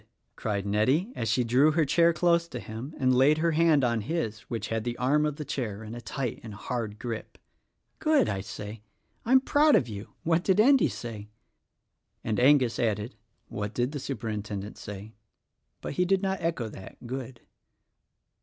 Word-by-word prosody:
cried 100 Hz, -2 st, -2 dB
Nettie 130 Hz, -, +1 dB
as 115 Hz, -, -2 dB
she 125 Hz, +3 st, +2 dB
drew 130 Hz, +6 st, +4 dB
her 160 Hz, -1 st, +3 dB
chair 170 Hz, +4 st, +4 dB
close 170 Hz, 0 st, +2 dB
to 125 Hz, -, -6 dB
him 115 Hz, +7 st, -7 dB
and 130 Hz, -1 st, +3 dB
laid 135 Hz, +4 st, +5 dB
her 165 Hz, +1 st, +2 dB
hand 160 Hz, -3 st, +4 dB
on 115 Hz, -2 st, +1 dB
his 115 Hz, -5 st, -2 dB
which 115 Hz, -, -3 dB
had 115 Hz, -1 st, -1 dB
the 120 Hz, 0 st, -3 dB
arm 150 Hz, +4 st, +2 dB
of 150 Hz, -, -3 dB
the 150 Hz, -, -6 dB
chair 110 Hz, -7 st, -4 dB
in 110 Hz, +1 st, -8 dB
a 120 Hz, -, -7 dB
tight 125 Hz, -1 st, -4 dB
and 110 Hz, -3 st, -9 dB
hard 110 Hz, 0 st, -4 dB
grip. 115 Hz, -1 st, -6 dB, 0.6 s
"Good! 310 Hz, -4 st, +3 dB
I 95 Hz, -, -2 dB
say. 105 Hz, +2 st, -8 dB, 0.4 s
I 235 Hz, -, -2 dB
am 260 Hz, -, +7 dB
proud 295 Hz, +2 st, +4 dB
of 120 Hz, -, +3 dB
you. 105 Hz, -1 st, -8 dB
What 165 Hz, +1 st, +2 dB
did 190 Hz, +1 st, +2 dB
Endy 265 Hz, +4 st, +5 dB
say?" 105 Hz, -3 st, -7 dB, 0.9 s
And 110 Hz, -2 st, -1 dB
Angus 130 Hz, -2 st, +4 dB
added, 110 Hz, 0 st, -1 dB, 0.3 s
"What 105 Hz, +1 st, -5 dB
did 125 Hz, +2 st, 0 dB
the 145 Hz, -, -4 dB
Superintendent 105 Hz, -5 st, -4 dB
say?" 105 Hz, +2 st, -8 dB, 0.7 s
but -, -, -5 dB
he 180 Hz, +5 st, +1 dB
did 195 Hz, +1 st, +2 dB
not 190 Hz, 0 st, -1 dB
echo 165 Hz, -9 st, -1 dB
that 100 Hz, +3 st, -11 dB
"Good." 130 Hz, 0 st, -6 dB
125 Hz, 180 wpm, -28 LUFS, 110-160 Hz, 0.9 s, am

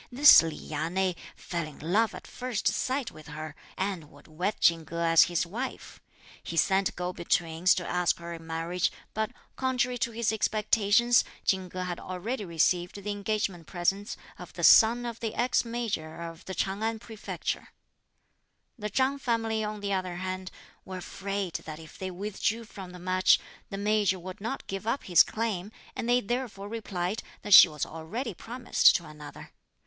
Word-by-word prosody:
This 285 Hz, +4 st, +9 dB
Li 165 Hz, -2 st, -3 dB
Ya 155 Hz, +2 st, -4 dB
nei 190 Hz, +1 st, +1 dB, 0.2 s
fell 170 Hz, -3 st, -4 dB
in 150 Hz, -, -12 dB
love 205 Hz, +9 st, +1 dB
at -, -, -10 dB
first 250 Hz, -4 st, -4 dB
sight 260 Hz, -1 st, 0 dB
with 155 Hz, -1 st, -13 dB
her, 155 Hz, 0 st, -7 dB, 0.2 s
and 185 Hz, -6 st, -3 dB
would 145 Hz, -, -18 dB
wed 180 Hz, +7 st, -2 dB
Chin 165 Hz, -1 st, +4 dB
Ko 170 Hz, +2 st, -7 dB
as 165 Hz, -1 st, +6 dB
his 175 Hz, -1 st, 0 dB
wife. 235 Hz, +10 st, -6 dB, 0.4 s
He 165 Hz, -, -6 dB
sent 195 Hz, +2 st, +2 dB
go 180 Hz, +1 st, -3 dB
betweens 170 Hz, +1 st, +2 dB
to 180 Hz, -, -3 dB
ask 180 Hz, -1 st, +1 dB
her 170 Hz, 0 st, -7 dB
in 165 Hz, -1 st, -10 dB
marriage, 165 Hz, +2 st, -1 dB, 0.2 s
but, 220 Hz, 0 st, -1 dB, 0.3 s
contrary 250 Hz, -1 st, 0 dB
to 235 Hz, -, 0 dB
his 230 Hz, -1 st, 0 dB
expectations, 220 Hz, +2 st, +3 dB, 0.2 s
Chin 190 Hz, -1 st, +1 dB
Ko 185 Hz, +1 st, -5 dB
had 180 Hz, -1 st, -4 dB
already 205 Hz, +6 st, -4 dB
received 175 Hz, +1 st, +1 dB
the 205 Hz, -, -2 dB
engagement 200 Hz, -4 st, -2 dB
presents 195 Hz, +3 st, -1 dB, 0.2 s
of -, -, -10 dB
the -, -, -6 dB
son 235 Hz, +2 st, +7 dB
of 235 Hz, -1 st, -5 dB
the 225 Hz, -2 st, -3 dB
ex 245 Hz, +1 st, +2 dB
Major 220 Hz, -10 st, -4 dB
of 165 Hz, -1 st, -8 dB
the 190 Hz, -, -5 dB
Ch'ang 195 Hz, +3 st, -1 dB
An 225 Hz, 0 st, 0 dB
Prefecture. 220 Hz, -1 st, -5 dB, 1.1 s
The 210 Hz, 0 st, -3 dB
Chang 265 Hz, +6 st, +1 dB
family, 225 Hz, -3 st, 0 dB
on 210 Hz, 0 st, -4 dB
the 200 Hz, -1 st, -1 dB
other 185 Hz, -2 st, -2 dB
hand, 185 Hz, +1 st, -4 dB, 0.3 s
were 185 Hz, -1 st, -7 dB
afraid 195 Hz, 0 st, -4 dB
that 155 Hz, -1 st, -6 dB
if 160 Hz, -1 st, -13 dB
they 190 Hz, -, -3 dB
withdrew 210 Hz, +4 st, -2 dB
from 195 Hz, -4 st, -10 dB
the 180 Hz, -, -10 dB
match, 185 Hz, +1 st, +4 dB, 0.3 s
the 195 Hz, -, -5 dB
Major 205 Hz, -1 st, +2 dB
would 185 Hz, +3 st, -9 dB
not 230 Hz, +6 st, -4 dB
give 195 Hz, +2 st, -5 dB
up 250 Hz, +4 st, 0 dB
his 175 Hz, -3 st, +6 dB
claim, 215 Hz, -3 st, -1 dB, 0.2 s
and 235 Hz, -, -3 dB
they 245 Hz, +1 st, +4 dB
therefore 230 Hz, -3 st, -3 dB
replied 205 Hz, -3 st, -3 dB, 0.2 s
that 205 Hz, -, +2 dB
she 190 Hz, -, +12 dB
was 150 Hz, -2 st, -3 dB
already 200 Hz, +10 st, -5 dB
promised 240 Hz, +7 st, +3 dB
to 175 Hz, -, -1 dB
another. 150 Hz, -1 st, -11 dB
190 Hz, 180 wpm, -28 LUFS, 175-220 Hz, 1.1 s, she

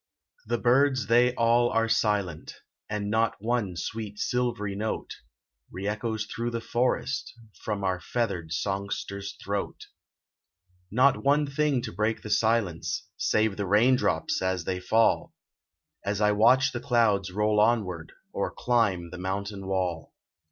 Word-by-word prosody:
The 120 Hz, +1 st, 0 dB
birds 130 Hz, 0 st, +3 dB
they 120 Hz, +3 st, +4 dB
all 120 Hz, 0 st, +3 dB
are 115 Hz, 0 st, +1 dB
silent, 100 Hz, -8 st, 0 dB, 0.3 s
And 105 Hz, -1 st, -2 dB
not 115 Hz, +1 st, +2 dB
one 110 Hz, -4 st, -1 dB
sweet 105 Hz, +4 st, -5 dB
silvery 115 Hz, -4 st, -1 dB
note, 110 Hz, +2 st, -3 dB, 0.6 s
Re 95 Hz, +2 st, -5 dB
echoes 110 Hz, 0 st, -2 dB
through 115 Hz, +3 st, -3 dB
the 115 Hz, 0 st, -3 dB
forest, 125 Hz, +2 st, -1 dB, 0.3 s
From 105 Hz, -2 st, -3 dB
our 95 Hz, -1 st, 0 dB
feathered 90 Hz, -5 st, -2 dB
songster's 100 Hz, +2 st, -3 dB
throat. 100 Hz, 0 st, -3 dB, 1.1 s
Not 130 Hz, +6 st, +3 dB
one 145 Hz, +2 st, +3 dB
thing 140 Hz, -2 st, 0 dB
to -, -, -5 dB
break 110 Hz, +4 st, -1 dB
the 105 Hz, -, -6 dB
silence, 110 Hz, -7 st, 0 dB
Save 110 Hz, -2 st, +1 dB
the 100 Hz, -2 st, -2 dB
rain 110 Hz, +7 st, +5 dB
drops -, -, 0 dB
as 95 Hz, -2 st, -1 dB
they 90 Hz, +2 st, -2 dB
fall, 110 Hz, +5 st, +2 dB, 0.7 s
As 100 Hz, 0 st, -2 dB
I 105 Hz, -1 st, +4 dB
watch 125 Hz, +5 st, +4 dB
the 120 Hz, -, -4 dB
clouds 115 Hz, -7 st, +2 dB
roll 105 Hz, +2 st, +1 dB
onward, 100 Hz, -8 st, +1 dB, 0.2 s
Or -, -, -1 dB
climb 100 Hz, -9 st, 0 dB
the 90 Hz, -, -8 dB
mountain 100 Hz, +1 st, -4 dB
wall. 90 Hz, -4 st, -2 dB
105 Hz, 140 wpm, -27 LUFS, 100-120 Hz, 1.1 s, rain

